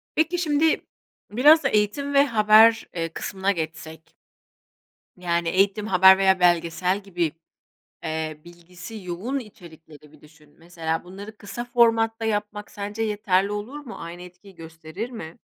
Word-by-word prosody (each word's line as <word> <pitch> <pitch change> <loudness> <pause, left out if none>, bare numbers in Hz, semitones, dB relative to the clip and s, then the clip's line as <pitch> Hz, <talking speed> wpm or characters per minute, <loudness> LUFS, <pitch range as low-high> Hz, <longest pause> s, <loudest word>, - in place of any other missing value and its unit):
Peki, 320 +3 +1
şimdi 315 -1 +1 0.5
biraz 295 +7 +5
eğitim 265 +5 0
ve 280 0 +5
haber, 220 -1 +5
eee, 165 -1 -2
kısmına 195 0 -2
geçsek. 160 -2 -7 1.0
Yani, 170 -1 -1
eğitim, 200 +3 +1
haber 190 0 +6
veya 190 -1 +3
belgesel 175 +2 +1
gibi, 175 -5 -2 0.7
eee, 155 -1 -4
bilgisi 175 +5 -12
yoğun 190 +10 -4
içerikleri 160 - -14
bir 155 - -19
düşün. 150 -1 -21
Mesela 165 -1 -4
bunları 200 +4 -11
kısa 220 +3 -7
formatta 230 -2 +2
yapmak 210 -1 -3
sence 205 +2 -5
yeterli 205 -2 0
olur 210 +8 -6
mu? 265 -6 -10
Aynı 170 +1 -9
etkiyi 180 +2 -15
gösterir 165 +7 -8
mi? 165 -9 -9
195 Hz, 130 wpm, -23 LUFS, 170-225 Hz, 1.0 s, haber